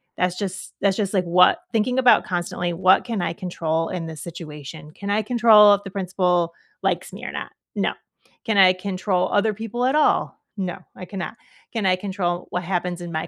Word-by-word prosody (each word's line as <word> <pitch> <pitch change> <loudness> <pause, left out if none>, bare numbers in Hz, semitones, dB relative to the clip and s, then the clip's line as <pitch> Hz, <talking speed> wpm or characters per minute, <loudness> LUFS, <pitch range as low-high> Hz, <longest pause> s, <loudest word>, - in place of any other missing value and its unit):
that's 180 0 0
just 190 -2 -5
that's 195 -1 +2
just 205 -2 -1
like, 185 -2 +2
what 180 +1 +4
thinking 240 +3 0
about 255 -2 +5
constantly, 175 -1 -2
"What 185 +2 +4
can 225 -6 -2
I 170 - -1
control 165 -3 -2
in 180 -3 -4
this 160 -2 -8
situation? 155 -3 -9
Can 200 +5 -7
I 210 +2 +2
control 215 -2 +6
if 200 - -8
the - - -5
principal 180 -3 0 0.3
likes - - -1
me - - -9
or - - -4
not? - - -6 0.2
No. - - 0 0.5
Can 220 -3 0
I 185 -2 +7
control 185 0 -1
other 210 +1 +2
people 225 +4 -3
at 265 +3 +2
all? 305 - +2 0.2
No, 185 -2 -3 0.2
I 185 - -8
cannot. 190 +2 -6 0.4
Can 220 -4 -2
I 185 -1 +4
control 185 -2 -3
what 180 0 -3
happens 180 -1 -2
in 170 -1 -7
my 160 - -2
185 Hz, 200 wpm, -22 LUFS, 175-205 Hz, 0.5 s, I